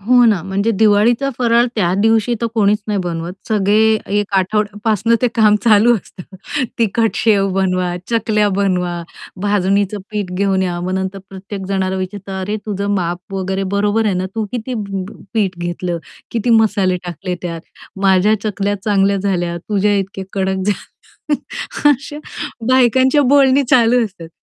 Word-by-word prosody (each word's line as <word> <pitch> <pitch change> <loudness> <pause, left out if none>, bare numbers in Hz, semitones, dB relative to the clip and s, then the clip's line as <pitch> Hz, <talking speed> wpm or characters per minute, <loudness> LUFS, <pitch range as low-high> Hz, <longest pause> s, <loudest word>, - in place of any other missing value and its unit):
हो 245 +4 +4
ना, 215 -6 +3
म्हणजे 195 +4 -1
दिवाळीचा 220 +5 +3
फराळ 235 -1 +3
त्या 180 -5 +1
दिवशी 225 +3 +2
तर 235 - 0
कोणीच 210 -2 +3
नाही 205 -2 0
बनवत. 170 -1 -4 0.2
सगळे 215 +1 +3 0.2
एक 205 - -6
आठवड्यापासून 210 +3 +1
ते 250 - +4
काम 215 -2 +5
चालू 230 +1 +5
असतं. 190 -2 -11 0.6
तिखट 225 0 +2
शेव 205 -3 +2
बनवा, 185 -2 0 0.2
चकल्या 215 -2 +2
बनवा, 180 -3 0 0.4
भाजणीचं 200 0 +1
पीठ 205 -4 -3
घेऊन 195 -1 +1
या, 175 -2 -2
मग 180 +1 -3
नंतर 190 +1 -3
प्रत्येक 195 0 -8
जणाला 190 -1 -1
विचारतं, 190 0 -5
"अरे 205 +3 -2
तुझं 200 -1 -1
माप 175 0 -3
वगैरे 190 0 -2
बरोबर 210 +2 +1
आहे 200 - +1
ना? 185 +1 -1
तू 220 -1 -1
किती 245 +1 -4
प 200 -4 -4
प - - -11 0.2
पीठ 195 -5 0
घेतलं? 175 0 -3 0.3
किती 235 +1 -1
मसाले 205 -5 +3
टाकले 180 +1 -4
त्यात? 170 -2 -4 0.4
माझ्या 195 +2 +4
चकल्या 205 -1 -1
चांगल्या 200 -1 +2
झाल्या, 180 -3 -1
तुझ्या 205 0 +2
इतक्या 195 0 -4
कडक 190 -1 -1
झाल्या." 290 - -5 0.5
अशा 285 +2 -2 0.5
बायकांच्या 260 +2 +4
बोलणी 275 0 +5
चालू 240 0 +4
असतात 185 -6 -9
200 Hz, 150 wpm, -17 LUFS, 190-220 Hz, 0.6 s, काम